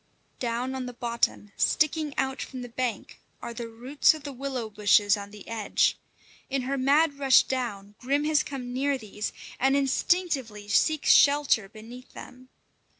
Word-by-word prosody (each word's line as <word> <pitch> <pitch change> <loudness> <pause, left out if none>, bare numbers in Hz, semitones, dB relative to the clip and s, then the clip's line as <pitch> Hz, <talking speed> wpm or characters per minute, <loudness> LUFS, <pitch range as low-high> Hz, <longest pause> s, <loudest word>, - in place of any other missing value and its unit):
Down 245 +2 -2
on 260 -1 -4
the 245 - -7
bottom, 235 -3 -1
sticking 310 -1 +1
out 265 0 -1
from 255 -2 -6
the 245 - -8
bank, 245 0 -4 0.2
are 235 - -7
the 235 0 -6
roots 250 +7 +2
of 310 - -11
the 285 -1 -6
willow 260 -3 -4
bushes 205 0 +3
on 200 -1 -8
the 210 -1 -13
edge. 225 -3 +1 0.5
In 270 -1 -1
her 270 +2 -2
mad 280 +2 +2
rush 270 -2 +6
down, 210 -6 -4
Grim 280 +3 0
has 305 0 +3
come 260 -4 -6
near 275 +2 0
these, 210 -2 -5 0.3
and 270 +1 +3
instinctively 270 - 0
seeks 305 +9 +2
shelter 280 -8 +4
beneath 230 +4 -12
them. 255 0 -12
255 Hz, 160 wpm, -27 LUFS, 225-280 Hz, 0.5 s, rush